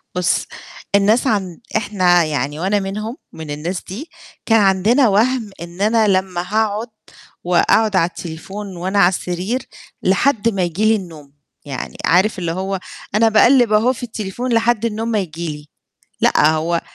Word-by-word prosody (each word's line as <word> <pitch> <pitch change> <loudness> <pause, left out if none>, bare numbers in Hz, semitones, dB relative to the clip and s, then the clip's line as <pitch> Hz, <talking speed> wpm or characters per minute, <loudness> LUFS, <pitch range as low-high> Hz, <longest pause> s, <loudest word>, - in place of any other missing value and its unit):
بُصّ، 180 -1 +1 0.5
الناس 210 +6 +3
عن 190 -7 -1 0.2
إحنا 185 -5 +2
يعني 150 -1 -2
وأنا 195 +4 +1
منهم 215 +5 -5 0.2
من 160 -2 -8
الناس 165 +5 -4
دي، 240 - -8 0.4
كان 225 -1 +4
عندنا 205 +7 +3
وَهْم 225 +2 +1
إن 170 +2 -8
أنا 220 +1 +3
لمّا 185 -2 0
هاقعد 215 +3 -1 0.6
وأقعد 195 +4 +2
على 170 -2 +3
التليفون 185 +4 -8
وأنا 190 +4 -1
على 175 - +6
السرير 185 +7 -3 0.4
لحد 230 +4 +2
ما 195 -4 -2
ييجي 175 +5 -1
لي 220 +1 +5
النوم، 160 -8 -9 0.3
يعني 140 -3 -6
عارف 190 +4 +3
اللي 170 -2 -2
هو 190 +2 -3 0.4
أنا 225 +1 +4
باقلِّب 240 +1 +5
أهو 225 +4 +3
في 250 - -10
التليفون 230 +2 -4
لحد 230 0 +2
النوم 225 0 -2
ما 215 - +1
ييجي 170 -2 -5
لي. 150 0 -15 0.5
لأ، 150 - +4
هو 165 +2 0
195 Hz, 155 wpm, -18 LUFS, 175-220 Hz, 0.6 s, على